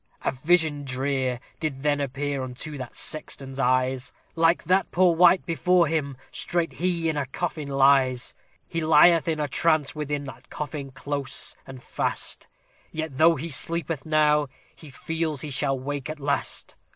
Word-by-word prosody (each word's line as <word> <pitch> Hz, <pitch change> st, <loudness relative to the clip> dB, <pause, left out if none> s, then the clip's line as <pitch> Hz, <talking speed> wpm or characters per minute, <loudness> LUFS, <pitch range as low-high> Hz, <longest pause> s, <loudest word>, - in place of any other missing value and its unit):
A -, -, +1 dB
vision 150 Hz, +1 st, +1 dB
drear 130 Hz, -1 st, -1 dB, 0.2 s
did 140 Hz, -4 st, -3 dB
then 145 Hz, -1 st, +1 dB
appear 140 Hz, +1 st, -2 dB
unto 130 Hz, +4 st, -5 dB
that 130 Hz, -3 st, -7 dB
sexton's 135 Hz, -3 st, -1 dB
eyes; 130 Hz, +1 st, +1 dB, 0.2 s
Like 165 Hz, +1 st, +3 dB
that 185 Hz, +1 st, +2 dB
poor 180 Hz, -1 st, +3 dB
wight 175 Hz, +2 st, +5 dB
before 175 Hz, +1 st, +3 dB
him 145 Hz, -4 st, -2 dB
straight 170 Hz, -1 st, -1 dB
he 170 Hz, -2 st, -1 dB
in 155 Hz, -2 st, 0 dB
a 140 Hz, -2 st, -1 dB
coffin 155 Hz, +1 st, -4 dB
lies. 135 Hz, -2 st, +3 dB, 0.3 s
He 165 Hz, -, -3 dB
lieth 160 Hz, +2 st, +5 dB
in 160 Hz, -2 st, 0 dB
a 150 Hz, -, 0 dB
trance 155 Hz, 0 st, +1 dB
within 145 Hz, -1 st, -3 dB
that 130 Hz, -3 st, -11 dB
coffin 145 Hz, -2 st, -5 dB
close 140 Hz, +1 st, -3 dB
and 130 Hz, -1 st, -10 dB
fast; -, -, -3 dB, 0.4 s
Yet 160 Hz, -4 st, -5 dB
though 165 Hz, +1 st, +6 dB
he 160 Hz, +4 st, -5 dB
sleepeth 165 Hz, +1 st, -2 dB
now, 150 Hz, -2 st, +3 dB, 0.3 s
he 155 Hz, -, -13 dB
feels 160 Hz, +1 st, -3 dB
he 150 Hz, -, -5 dB
shall 135 Hz, +1 st, +1 dB
awake 140 Hz, +1 st, -4 dB
at 155 Hz, 0 st, -5 dB
last. 140 Hz, 0 st, -2 dB
145 Hz, 160 wpm, -25 LUFS, 135-160 Hz, 0.4 s, though